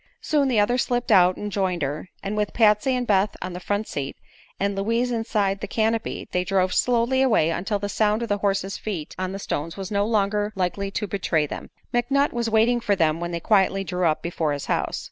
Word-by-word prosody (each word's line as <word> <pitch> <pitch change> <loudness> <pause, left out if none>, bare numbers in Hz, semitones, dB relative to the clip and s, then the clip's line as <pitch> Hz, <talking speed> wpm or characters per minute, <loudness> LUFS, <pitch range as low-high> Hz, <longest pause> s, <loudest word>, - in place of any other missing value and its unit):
Soon 300 - +1
the 245 -5 +2
others 240 +4 +2
slipped 245 0 -1
out 180 0 +5
and 210 0 -5
joined 185 -5 -1
her, 145 +6 -4
and 200 +2 -3
with 210 -1 -1
Patsy 220 +3 +4
and 250 -1 -1
Beth 200 -2 +2
on 185 0 -5
the 180 - -5
front 205 +3 -2
seat 140 -1 -4 0.4
and 200 0 0
Louise 230 +5 0
Inside 210 -4 0
the - - -4
canopy 225 +2 -1
they 180 - +1
drove 185 0 +1
slowly 250 +2 +2
away 220 -11 +3
until 195 +5 -1
the 205 0 -3
sound 210 +2 +1
of 235 - -4
the 205 0 0
horse's 195 -1 -1
feet 180 -8 -5
on 185 0 -2
the 195 - -4
stones 165 -3 -4
was 195 +1 -6
no 200 0 +1
longer 210 -1 +1
likely 190 +1 -1
to 210 +2 -3
betray 180 -6 0
them. - - -7 0.2
McNutt 275 +4 +2
was 235 -1 -1
waiting 225 +2 +3
for 210 -3 +1
them 160 -3 +1
when 175 0 -3
they 170 -1 -3
quietly 195 0 +2
drew 180 -2 0
up 155 - 0
before 165 -3 -1
his 145 - -4
house. - - -1
200 Hz, 220 wpm, -24 LUFS, 185-225 Hz, 0.4 s, out